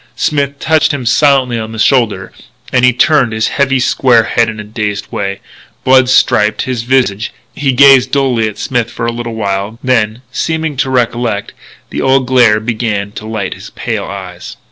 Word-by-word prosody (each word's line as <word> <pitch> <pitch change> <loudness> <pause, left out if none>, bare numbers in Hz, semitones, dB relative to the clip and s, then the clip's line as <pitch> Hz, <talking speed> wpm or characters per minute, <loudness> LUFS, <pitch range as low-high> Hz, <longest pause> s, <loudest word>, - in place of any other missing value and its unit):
Smith 140 -2 -1
touched 160 +2 +2
him 140 -4 -4
silently 130 -1 +2
on 110 0 -6
the - - -7
shoulder 105 -5 +1 0.4
and 130 -1 +2
he 125 - +6
turned 135 -1 +2
his 110 0 -1
heavy, 135 -2 +1
square 125 -2 +3
head 115 0 +1
in 110 -1 -7
a - - -6
dazed 105 -1 -4
way. 100 0 -3 0.4
Blood 130 -1 +4
striped 110 -4 +2
his 125 -3 -3
visage. 115 -4 0 0.2
He 140 -1 0
gazed 130 0 +5
dully 130 -5 +1
at 105 -1 -7
Smith 120 -3 -2
for 115 - -5
a 115 - 0
little 115 -1 -5
while, 100 0 -3
then, 115 -2 0
seeming 160 +2 -2
to 135 -1 0
recollect, 120 -4 -1 0.4
the - - -3
old 135 0 +2
glare 120 -4 +4
began 110 -3 -3
to 110 +1 -8
light 110 -4 -3
his - - -11
pale - - -4
eyes. 95 -3 -8
120 Hz, 180 wpm, -13 LUFS, 110-130 Hz, 0.4 s, he